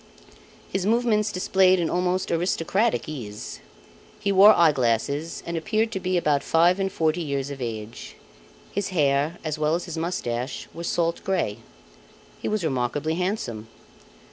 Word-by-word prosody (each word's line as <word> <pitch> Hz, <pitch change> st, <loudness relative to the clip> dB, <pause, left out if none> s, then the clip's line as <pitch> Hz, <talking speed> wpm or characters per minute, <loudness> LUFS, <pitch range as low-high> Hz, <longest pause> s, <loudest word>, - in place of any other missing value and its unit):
His 195 Hz, -, -1 dB
movements 220 Hz, -2 st, +2 dB
displayed 185 Hz, 0 st, +3 dB
an 170 Hz, -, +1 dB
almost 180 Hz, +2 st, 0 dB
aristocratic 180 Hz, +6 st, 0 dB
ease. 110 Hz, -9 st, -7 dB, 0.6 s
He 200 Hz, -, 0 dB
wore 200 Hz, +2 st, +8 dB
eye 170 Hz, -2 st, +6 dB
glasses 140 Hz, +5 st, -1 dB
and 170 Hz, -, -4 dB
appeared 215 Hz, +6 st, 0 dB
to 190 Hz, -, -3 dB
be 185 Hz, 0 st, 0 dB
about 150 Hz, -4 st, +2 dB
five 175 Hz, +3 st, +3 dB
and 195 Hz, 0 st, 0 dB
forty 160 Hz, +1 st, 0 dB
years 140 Hz, -3 st, -2 dB
of 135 Hz, -2 st, -7 dB
age. 110 Hz, -2 st, -6 dB, 0.6 s
His 200 Hz, 0 st, -2 dB
hair 150 Hz, -2 st, +1 dB
as 155 Hz, -1 st, -3 dB
well 155 Hz, +1 st, +2 dB
as 175 Hz, -, -3 dB
his 170 Hz, -2 st, -5 dB
moustache 130 Hz, -7 st, -3 dB
were 170 Hz, -, -7 dB
salt 170 Hz, 0 st, 0 dB
grey. 185 Hz, -, -1 dB, 0.8 s
He -, -, -3 dB
was 215 Hz, -3 st, -1 dB
remarkably 140 Hz, +2 st, -1 dB
handsome. 165 Hz, -, -3 dB
165 Hz, 150 wpm, -25 LUFS, 140-185 Hz, 0.8 s, wore